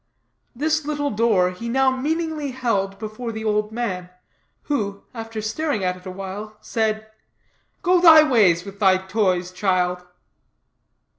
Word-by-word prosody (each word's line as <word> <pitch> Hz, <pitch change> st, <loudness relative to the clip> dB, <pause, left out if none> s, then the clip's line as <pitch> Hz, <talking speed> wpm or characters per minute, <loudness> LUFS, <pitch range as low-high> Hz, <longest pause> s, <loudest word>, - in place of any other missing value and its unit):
This 310 Hz, +4 st, 0 dB
little 290 Hz, -1 st, -2 dB
door 205 Hz, -5 st, +2 dB
he 230 Hz, +6 st, -6 dB
now 265 Hz, +2 st, +3 dB
meaningly 305 Hz, +2 st, -2 dB
held 215 Hz, -7 st, -1 dB
before 215 Hz, +3 st, -6 dB
the 220 Hz, 0 st, -6 dB
old 210 Hz, 0 st, 0 dB
man, 190 Hz, -6 st, -3 dB, 0.5 s
who, 200 Hz, -9 st, -2 dB
after 225 Hz, -2 st, -6 dB
staring 230 Hz, -1 st, -1 dB
at 180 Hz, 0 st, 0 dB
it 185 Hz, +1 st, -13 dB
a -, -, -5 dB
while, 195 Hz, +3 st, -7 dB
said: 220 Hz, -1 st, -1 dB, 0.8 s
"Go 360 Hz, 0 st, +4 dB
thy 320 Hz, -3 st, +9 dB
ways 195 Hz, -, +3 dB
with 200 Hz, 0 st, -10 dB
thy 190 Hz, -3 st, +5 dB
toys, 185 Hz, -2 st, 0 dB
child." 180 Hz, -2 st, 0 dB
215 Hz, 140 wpm, -22 LUFS, 190-260 Hz, 0.8 s, thy